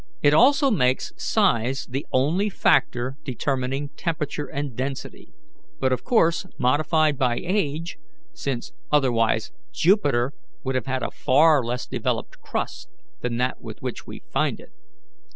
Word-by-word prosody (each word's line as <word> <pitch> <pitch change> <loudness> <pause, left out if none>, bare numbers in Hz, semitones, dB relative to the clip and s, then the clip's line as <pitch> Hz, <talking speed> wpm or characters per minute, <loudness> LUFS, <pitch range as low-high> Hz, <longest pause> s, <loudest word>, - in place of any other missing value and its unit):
It 145 0 +5
also 275 - +5
makes 130 - +1
size 120 +4 +1
the 135 +3 -4
only 160 +11 +2
factor 130 -6 +1
determining 135 +1 -2
temperature 150 -1 -3
and 140 -3 -4
density, 135 +2 -5 0.5
but 130 - +2
of 130 - -2
course 180 -6 +2
modified 150 +3 +2
by 125 -2 +2
age, 170 -3 -2 0.3
since 130 -4 -4 0.2
otherwise 120 - +2 0.2
Jupiter 145 - +2 0.3
would 130 - -1
have 130 0 -1
a - - -2
far 150 +1 +4
less 120 +2 -3
developed - - -3
crust - - -4 0.3
than 120 -1 -2
that 125 +1 -1
with - - -9
which - - -5
we - - -9
find - - +1
it. - - -15
140 Hz, 135 wpm, -24 LUFS, 130-155 Hz, 0.5 s, It